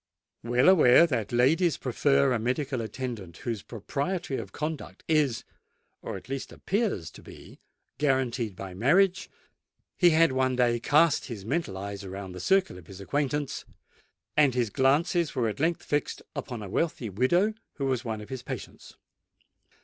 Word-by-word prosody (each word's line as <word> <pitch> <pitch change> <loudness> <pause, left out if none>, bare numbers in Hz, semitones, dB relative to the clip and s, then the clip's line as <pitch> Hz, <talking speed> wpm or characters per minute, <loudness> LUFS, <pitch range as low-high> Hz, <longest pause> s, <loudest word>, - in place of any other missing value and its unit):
Well 120 +4 +2
aware 170 -5 +7
that 125 -10 -2
ladies 150 +7 +3
prefer 140 +1 +2
a 120 - 0
medical 130 +2 -1
attendant 115 -7 -6
whose 115 -4 -2
propriety 140 - -3
of - - -6
conduct 155 0 -5
is—or 150 -7 -3
at - - -13
least 135 0 -5
appears 195 - -2
to - - -13
be—guaranteed 130 -6 -3
by 95 0 -7
marriage, 180 - +2 0.7
he 175 - +7
had 165 -2 +4
one 130 0 +1
day 120 -1 +2
cast 150 +6 +3
his 110 -7 -7
mental 125 - -2
eyes 100 +1 -6
around 95 0 -7
the 90 - -8
circle 190 - +1
of 85 - -17
his 95 0 -11
acquaintance; 145 +6 -2 0.7
and 145 -5 +4
his 120 -4 0
glances 150 - +2
were 120 -3 +1
at 110 - -4
length 165 +3 0
fixed 145 -1 -2
upon 120 -5 -5
a - - -6
wealthy 120 - -2
widow 175 - +2 0.2
who 140 - -3
was 130 -2 0
one 110 -3 -4
of 105 - -11
his 130 -2 -5
patients. - - -8
130 Hz, 155 wpm, -27 LUFS, 115-150 Hz, 0.7 s, aware